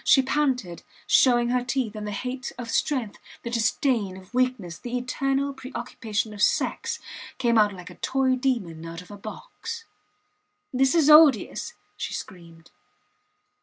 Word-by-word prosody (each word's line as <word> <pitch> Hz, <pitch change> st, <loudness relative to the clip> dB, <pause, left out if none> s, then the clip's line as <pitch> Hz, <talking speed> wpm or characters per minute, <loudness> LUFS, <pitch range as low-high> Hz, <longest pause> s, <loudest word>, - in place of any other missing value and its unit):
She 270 Hz, -, +5 dB
panted, 255 Hz, -, 0 dB, 0.2 s
showing 240 Hz, -2 st, +4 dB
her 250 Hz, 0 st, +1 dB
teeth, 250 Hz, -3 st, -2 dB
and 210 Hz, 0 st, -5 dB
the -, -, -3 dB
hate 250 Hz, +4 st, -4 dB
of 240 Hz, -2 st, -5 dB
strength, 255 Hz, -8 st, -1 dB, 0.2 s
the 235 Hz, -, -4 dB
disdain 230 Hz, -4 st, +1 dB
of 190 Hz, +4 st, -15 dB
weakness, 250 Hz, -9 st, 0 dB
the 245 Hz, 0 st, -3 dB
eternal 275 Hz, +2 st, -1 dB
preoccupation 235 Hz, -5 st, -4 dB
of 205 Hz, -, -7 dB
sex -, -, +1 dB, 0.4 s
came 235 Hz, -2 st, +2 dB
out 210 Hz, -2 st, +5 dB
like 180 Hz, -2 st, -10 dB
a -, -, -13 dB
toy 265 Hz, -1 st, +2 dB
demon 230 Hz, -12 st, -1 dB
out 165 Hz, +1 st, -7 dB
of 180 Hz, -, -16 dB
a -, -, -7 dB
box. 455 Hz, -, -8 dB, 0.9 s
This 265 Hz, +3 st, +3 dB
is 320 Hz, -4 st, +4 dB
odious, 300 Hz, -6 st, +5 dB, 0.2 s
she -, -, -4 dB
screamed. 170 Hz, -4 st, -10 dB
245 Hz, 150 wpm, -25 LUFS, 205-265 Hz, 0.9 s, She